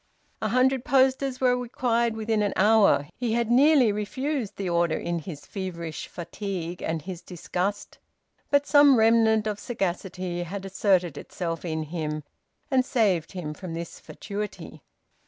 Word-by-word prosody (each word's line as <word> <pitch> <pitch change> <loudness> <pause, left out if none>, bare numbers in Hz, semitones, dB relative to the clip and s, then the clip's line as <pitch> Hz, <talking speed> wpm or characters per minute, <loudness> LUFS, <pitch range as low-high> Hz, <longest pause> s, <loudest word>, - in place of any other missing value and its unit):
A - - 0
hundred 255 0 +2
posters 265 0 +2
were 250 -1 +3
required 235 -2 0
within 220 -1 0
an 205 -1 0
hour. 205 -8 +4
He 240 -3 -1
had 235 0 0
nearly 270 -2 +5
refused 260 +3 -3
the 195 - -3
order, 170 -1 +1
in 170 0 -2
his 155 -3 -9
feverish 170 -5 -5
fatigue 180 -1 -5
and 160 -2 -2
his 180 -1 -7
disgust, 180 +3 -4 0.5
but 285 0 +3
some 290 -3 +6
remnant 220 -1 +4
of 210 -1 -2
sagacity 185 -4 -3
had 190 +3 -5
asserted 185 -5 +1
itself 165 -2 -5
in 160 -2 -2
him 155 -1 -4 0.5
and 260 -1 +4
saved 200 -11 +1
him 165 -5 -5
from 170 0 -7
this 170 0 -6
fatuity. 205 0 -7
200 Hz, 145 wpm, -26 LUFS, 175-235 Hz, 0.5 s, some